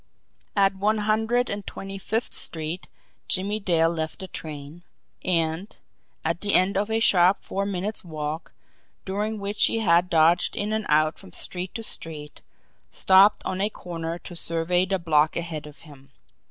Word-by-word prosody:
At 195 -1 +4
One 210 +3 +1
Hundred 220 +4 +1
and 200 0 -4
Twenty 195 0 -7
Fifth 220 +4 -2
Street 160 +3 -4 0.4
Jimmie 200 +3 0
Dale 170 -5 +2
left 160 -2 -3
the 190 - -7
train; 150 0 -8 0.4
and, 165 +2 -1 0.5
at 165 +1 -1
the 205 -1 +4
end 185 +2 +5
of 205 +2 0
a 220 0 +1
sharp 185 -3 +4
four 200 0 -2
minutes' 200 +2 -3
walk, 155 -1 -5 0.5
during 210 +3 -2
which 205 +1 +1
he - - 0
had 180 -4 +3
dodged 165 0 +3
in 210 +1 -1
and 220 -1 -2
out 155 +1 +3
from 190 -2 -14
street 180 +1 -3
to 225 - -4
street, 155 -7 -4 0.5
stopped 195 +2 +5
on 190 0 -2
a 205 - +2
corner 170 -4 -5
to 175 - -11
survey 170 +2 +1
the 190 0 +1
block 155 -3 +2
ahead 165 -3 -4
of 150 - -14
him. 140 -3 -16
180 Hz, 165 wpm, -25 LUFS, 165-205 Hz, 0.5 s, end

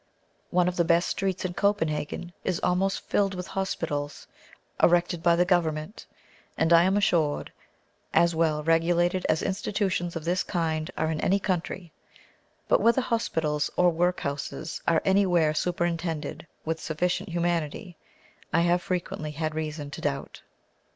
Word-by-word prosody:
One 180 0 +2
of 180 - -2
the 170 - +4
best 170 +1 +2
streets 190 -1 -2
in 180 - -2
Copenhagen 175 -4 -1
is 185 -3 -1
almost 190 +2 +1
filled 195 -1 +1
with 180 -1 -5
hospitals, 150 -7 -3 0.6
erected 175 -1 +3
by 170 0 +4
the 175 +1 +3
Government, 170 0 -1 0.5
and, 165 +1 +3
I 170 +1 +7
am 190 +2 +2
assured, 165 -7 +1 0.6
as 170 +1 +4
well 160 -2 +1
regulated 175 +3 +2
as 155 - +2
institutions 190 -3 -1
of 165 -1 -5
this 180 +2 +1
kind 160 -3 -1
are 160 - 0
in 155 - -2
any 195 - +3
country; 180 -2 -3 0.8
but - - +3
whether 235 +3 +4
hospitals 160 - 0
or 180 -1 +4
workhouses 160 -2 -2
are 165 -1 +3
anywhere 180 -5 +3
superintended 170 -1 -2 0.2
with 160 0 -2
sufficient 175 +4 -1
humanity 170 +1 -2 0.6
I 165 - +3
have 175 +1 +2
frequently 175 -4 -3
had 155 +1 -3
reason 155 -2 -4
to - - -7
doubt. 140 -1 -3
170 Hz, 145 wpm, -27 LUFS, 160-180 Hz, 0.8 s, I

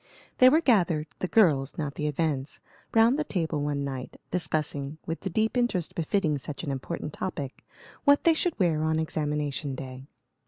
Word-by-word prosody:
They 255 - +9
were 310 +5 +4
gathered 180 - +3
the 185 - -1
girls, 150 -11 +3
not 145 -3 -2
the 150 - -2
events 145 -2 -1 0.4
round 230 +5 +5
the - - +1
table 165 - -2
one 145 -1 -1
night, 135 -2 -6
discussing, 155 -4 -1
with 165 - -3
the 190 - -4
deep 220 +6 0
interest 240 -9 0
befitting 160 -3 0
such 140 +3 -6
an 145 - -2
important 145 +3 -4
topic, 145 -8 -5 0.4
what 285 0 +5
they 335 - +6
should 335 +1 -1
wear 170 -6 +2
on 160 0 +1
examination 150 -3 -2
day. 130 0 -8
155 Hz, 170 wpm, -27 LUFS, 145-190 Hz, 0.4 s, They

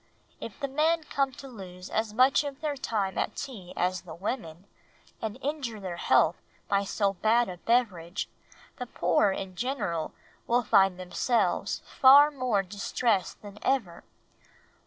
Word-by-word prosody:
If - - -8
the 280 - -2
men 315 +4 +1
come 275 -2 0
to 280 0 -10
lose 185 -6 -10
as 220 0 -1
much 255 +6 +4
of 280 -2 -6
their 300 -2 -2
time 205 -7 -2
at - - -2
tea 195 -10 -7
as 180 +1 0
the 165 -3 -10
women, 175 -3 -5 0.6
and 220 +1 -4
injure 270 -6 -3
their 185 -3 -5
health 170 0 +3 0.3
by 200 0 +1
so 200 0 0
bad 225 +5 +2
a 180 -1 -7
beverage, 195 -6 0 0.5
the 250 - -5
poor, 210 -2 +2
in 190 -1 -5
general, 205 - -2 0.4
will 240 +1 +2
find 195 -3 +4
themselves 185 +6 0
far 285 +3 +7
more 250 -8 0
distressed 205 +2 -1
than 205 0 -10
ever. 230 -11 -1
215 Hz, 150 wpm, -28 LUFS, 185-260 Hz, 0.6 s, far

